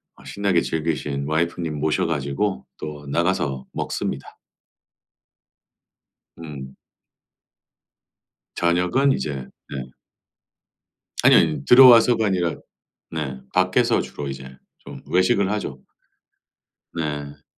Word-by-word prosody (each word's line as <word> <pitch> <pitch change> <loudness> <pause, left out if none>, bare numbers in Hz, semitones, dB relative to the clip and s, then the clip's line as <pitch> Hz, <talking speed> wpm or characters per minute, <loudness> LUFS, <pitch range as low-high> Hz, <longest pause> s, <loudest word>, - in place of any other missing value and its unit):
아 - - -18
신나게 100 -4 0
즐기신 75 -3 -2
와이프님 80 0 -1
모셔 80 +4 +1
가지고 70 +2 -2
또 75 -1 -7
나가서 70 -4 -1
먹습니다. 70 - -4 2.0
음. 70 -5 -9 1.8
저녁은 90 +11 +2
이제 70 - -4 0.3
예. 65 -2 -6 1.3
아니 - - +6
아니요. 75 -4 +3
들어와서가 120 -3 +7
아니라 90 -4 0 0.6
네. 70 -5 -4
밖에서 - - +2
주로 70 - -7
이제 65 -1 -8 0.2
좀 - - -11
외식을 95 +2 +2
하죠. 70 -11 -4 1.1
네. 75 -3 -5
80 Hz, 200 characters per minute, -22 LUFS, 70-90 Hz, 2.0 s, 들어와서가